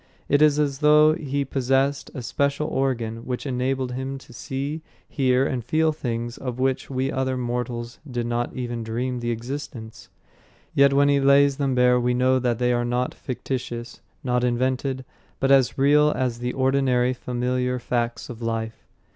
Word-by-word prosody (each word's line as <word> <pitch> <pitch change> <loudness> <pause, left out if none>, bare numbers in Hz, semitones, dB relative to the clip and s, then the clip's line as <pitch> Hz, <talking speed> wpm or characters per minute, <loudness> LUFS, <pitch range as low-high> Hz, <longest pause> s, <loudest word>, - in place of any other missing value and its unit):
It 145 +1 +3
is 150 -1 +5
as 140 -2 0
though 150 0 +6
he 140 -3 -2
possessed 135 +1 0
a 130 - -5
special 140 +4 0
organ 120 -4 -1
which 125 +3 -5
enabled 130 0 -1
him 130 +2 -4
to 135 - -15
see, 140 +6 -4 0.3
hear 130 -1 +2
and 130 -4 -2
feel 155 +6 +2
things 120 -5 -4
of 125 -2 -4
which 130 0 -1
we 135 0 -1
other 130 -1 -1
mortals 120 -1 -4
did 120 -2 -2
not 120 0 -1
even 120 -2 -4
dream 125 +3 -2
the 120 0 -3
existence. 120 -1 -6 0.6
Yet 140 0 +5
when 140 +1 +4
he 140 0 +4
lays 140 0 +4
them 135 -3 0
bare 125 0 +4
we 125 0 +1
know 130 +1 +3
that 120 -2 0
they 125 0 +1
are 120 0 +1
not 125 +1 -1
fictitious, 120 -2 -5 0.2
not 125 -1 0
invented, 130 +2 0 0.3
but 135 0 +2
as 135 -3 +4
real 145 +2 +5
as 125 -2 -1
the 125 +1 -2
ordinary 130 -2 +2
familiar 125 0 -1
facts 120 -1 -2
of 120 -1 -9
life. 115 -1 -4
130 Hz, 170 wpm, -24 LUFS, 120-135 Hz, 0.6 s, though